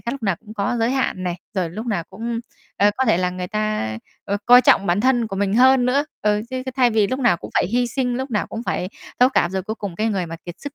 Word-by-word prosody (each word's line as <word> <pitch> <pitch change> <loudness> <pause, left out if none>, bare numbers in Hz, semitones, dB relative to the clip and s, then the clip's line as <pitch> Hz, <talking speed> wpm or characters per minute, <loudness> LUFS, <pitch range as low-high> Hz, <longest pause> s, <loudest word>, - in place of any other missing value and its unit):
khác, 235 - -4
lúc 275 -2 -7
nào 195 -5 +1
cũng 215 +3 -13
có 205 +3 -1
giới 230 +1 +1
hạn 260 -8 -1
này, 175 -1 -1 0.2
rồi 180 -4 -1
lúc 215 +7 -6
nào 195 -8 -1
cũng, 230 +4 -4 0.4
ờ, 205 +1 +4
có 265 - +1
thể 220 -8 +3
là 180 0 0
người 180 0 -5
ta, 215 - -2 0.3
ờ, 200 - -1
coi 245 +1 +9
trọng 195 - +4
bản 175 +3 +2
thân 245 -1 +2
của 195 -3 -5
mình 200 0 0
hơn 255 +1 +5
nữa. 275 +3 +2 0.2
Ừ, 210 0 +2
chứ 255 0 -3
chứ - - -2
thay 250 -2 +4
vì 215 -2 +3
lúc 255 +5 -2
nào 240 -9 +3
cũng - - -10
phải - - +2
hy 245 +6 +1
sinh, 245 0 -1
lúc 265 +1 -4
nào 210 -3 0
cũng 225 - -6
phải 185 -6 -2 0.3
thấu 250 - +7
cảm, 175 -9 +1
rồi 190 0 -2
cuối 215 +4 -4
cùng 200 -5 -6
cái 220 +3 0
người 190 -5 -1
mà 165 0 -7
kiệt 175 - -7
sức 285 -1 -7
215 Hz, 290 wpm, -21 LUFS, 190-245 Hz, 0.4 s, coi